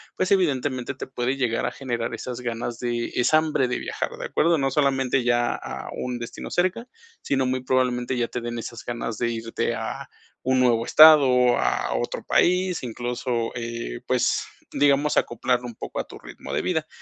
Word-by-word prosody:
pues, 185 Hz, -, -1 dB
evidentemente, 140 Hz, -8 st, +1 dB
te -, -, -6 dB
puede 130 Hz, 0 st, -2 dB
llegar 120 Hz, -3 st, 0 dB
a 120 Hz, -, -1 dB
generar 120 Hz, -4 st, -3 dB
esas 125 Hz, -1 st, -6 dB
ganas 120 Hz, 0 st, -4 dB
de 120 Hz, -1 st, -2 dB
esa 125 Hz, +5 st, +4 dB
hambre 155 Hz, -5 st, +1 dB
de 125 Hz, -, -1 dB
viajar. -, -, -3 dB
De -, -, -5 dB
acuerdo, 165 Hz, +1 st, +2 dB
no 135 Hz, -2 st, 0 dB
solamente 135 Hz, -2 st, +1 dB
ya 120 Hz, 0 st, +2 dB
a -, -, -7 dB
un 125 Hz, -1 st, -4 dB
destino 120 Hz, 0 st, -7 dB
cerca, 185 Hz, +7 st, 0 dB, 0.3 s
sino 135 Hz, -1 st, 0 dB
muy 130 Hz, 0 st, -1 dB
probablemente, 125 Hz, -1 st, 0 dB
ya 120 Hz, -, 0 dB
te 125 Hz, -, -4 dB
den 120 Hz, 0 st, -4 dB
esas 115 Hz, 0 st, -7 dB
ganas 120 Hz, -2 st, -4 dB
de 120 Hz, -1 st, 0 dB
irte 115 Hz, 0 st, -2 dB
a -, -, -5 dB, 0.3 s
un 130 Hz, 0 st, +2 dB
nuevo 120 Hz, -2 st, +3 dB
estado, 155 Hz, -1 st, +8 dB
o 125 Hz, -1 st, +4 dB
a -, -, 0 dB
otro -, -, -3 dB
país, 180 Hz, -1 st, +2 dB
incluso, 120 Hz, 0 st, -2 dB
eh, 115 Hz, -, -5 dB
pues, -, -, +1 dB, 0.3 s
digamos 145 Hz, +1 st, +3 dB
acoplarlo 125 Hz, +1 st, 0 dB
un 120 Hz, -, -9 dB
poco -, -, -6 dB
a -, -, -1 dB
tu -, -, -11 dB
ritmo -, -, -9 dB
de -, -, +1 dB
vida, 160 Hz, -4 st, -1 dB
125 Hz, 185 wpm, -24 LUFS, 120-140 Hz, 0.3 s, estado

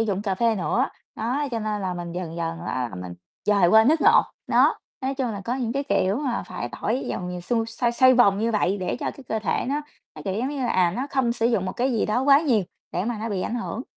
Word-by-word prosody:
dụng 205 Hz, -3 st, 0 dB
cà 195 Hz, -3 st, -1 dB
phê 230 Hz, +3 st, +2 dB
nữa, 185 Hz, -5 st, +1 dB, 0.3 s
đó, 255 Hz, +7 st, -1 dB
cho 235 Hz, -, -1 dB
nên 215 Hz, -1 st, -2 dB
là 185 Hz, -2 st, -2 dB
mình 175 Hz, -1 st, -6 dB
dần 175 Hz, -2 st, -5 dB
dần 165 Hz, -1 st, -3 dB
á 125 Hz, -1 st, -2 dB
là 110 Hz, -, -10 dB
mình 90 Hz, -1 st, -7 dB, 0.3 s
dời 200 Hz, -3 st, +4 dB
qua 220 Hz, +3 st, +7 dB
nước 310 Hz, +5 st, +3 dB
ngọt. 450 Hz, +7 st, +5 dB, 0.2 s
Đó, -, -, +4 dB, 0.2 s
nói 270 Hz, 0 st, -2 dB
chung 260 Hz, -3 st, -1 dB
là 200 Hz, -, -5 dB
có 240 Hz, -, -1 dB
những 245 Hz, -3 st, -2 dB
cái 275 Hz, +2 st, -1 dB
kiểu 195 Hz, -7 st, +1 dB
mà 260 Hz, -3 st, -2 dB
phải 120 Hz, -, -5 dB
tỏi 235 Hz, +5 st, -1 dB
dòng 180 Hz, -1 st, -3 dB
nhiều 180 Hz, 0 st, -5 dB
xung 225 Hz, +5 st, 0 dB
xoay 235 Hz, +1 st, -1 dB
xoay 255 Hz, +2 st, +6 dB
vòng 200 Hz, -5 st, +5 dB
như 225 Hz, +2 st, +1 dB
vậy 205 Hz, -2 st, +1 dB
để 185 Hz, -, -2 dB
cho -, -, -1 dB
cái 275 Hz, -, -13 dB
cơ 220 Hz, -, 0 dB
thể 210 Hz, -6 st, -1 dB
nó 285 Hz, +2 st, 0 dB, 0.3 s
nó, -, -, -9 dB
kiểu 195 Hz, -2 st, -2 dB
giống 245 Hz, +5 st, -1 dB
như 285 Hz, -1 st, -4 dB
là, 240 Hz, -, 0 dB
à, 180 Hz, -2 st, +3 dB
nó 260 Hz, +3 st, -2 dB
không 260 Hz, -4 st, +1 dB
sử 230 Hz, -1 st, +1 dB
dụng 225 Hz, -6 st, +1 dB
một 185 Hz, -, -3 dB
cái 255 Hz, +1 st, 0 dB
gì 225 Hz, -, +1 dB
đó 215 Hz, +4 st, +1 dB
quá 280 Hz, +1 st, +6 dB
nhiều 245 Hz, -, +2 dB, 0.3 s
để 180 Hz, -, -1 dB
mà 235 Hz, -1 st, -2 dB
nó 225 Hz, +2 st, -3 dB
bị 195 Hz, -4 st, -2 dB
ảnh -, -, -3 dB
hưởng, 235 Hz, 0 st, -4 dB
225 Hz, 280 wpm, -24 LUFS, 190-250 Hz, 0.3 s, qua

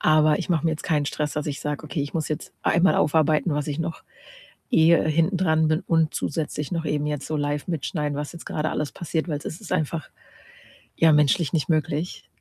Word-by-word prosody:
Aber 155 Hz, 0 st, +4 dB
ich 185 Hz, -, -5 dB
mache 165 Hz, -2 st, +1 dB
mir 160 Hz, -, +3 dB
jetzt 155 Hz, -, -4 dB
keinen 150 Hz, -3 st, +1 dB
Stress, 150 Hz, 0 st, -2 dB
dass 150 Hz, -, -2 dB
ich 145 Hz, 0 st, -3 dB
sage: 150 Hz, 0 st, -3 dB
„Okay, 155 Hz, 0 st, -3 dB
ich 145 Hz, -, -5 dB
muss 160 Hz, -2 st, -1 dB
jetzt 155 Hz, +1 st, -5 dB
einmal 175 Hz, +3 st, +3 dB
aufarbeiten, 155 Hz, +1 st, +2 dB
was 150 Hz, 0 st, -2 dB
ich 150 Hz, +2 st, -3 dB
noch 165 Hz, 0 st, -4 dB, 0.7 s
eh 165 Hz, -5 st, +6 dB
hintendran 160 Hz, -1 st, +2 dB
bin 155 Hz, 0 st, +2 dB
und 160 Hz, -2 st, +1 dB
zusätzlich 150 Hz, 0 st, -3 dB
noch 165 Hz, -2 st, -2 dB
eben 150 Hz, 0 st, 0 dB
jetzt 150 Hz, -2 st, -3 dB
so 155 Hz, -, -2 dB
live 145 Hz, +1 st, -2 dB
mitschneiden, 150 Hz, -3 st, -2 dB
was 145 Hz, 0 st, -4 dB
jetzt 170 Hz, -, -10 dB
grade 155 Hz, 0 st, -2 dB
alles 150 Hz, -1 st, -2 dB
passiert“, 165 Hz, 0 st, -3 dB
weil 150 Hz, -3 st, -1 dB
es -, -, -15 dB, 0.2 s
ist -, -, -10 dB
einfach, 155 Hz, 0 st, -1 dB, 0.9 s
ja, 165 Hz, -1 st, +5 dB
menschlich 150 Hz, +1 st, +3 dB
nicht 160 Hz, 0 st, 0 dB
möglich. 155 Hz, +1 st, -1 dB
155 Hz, 210 wpm, -24 LUFS, 150-165 Hz, 0.9 s, eh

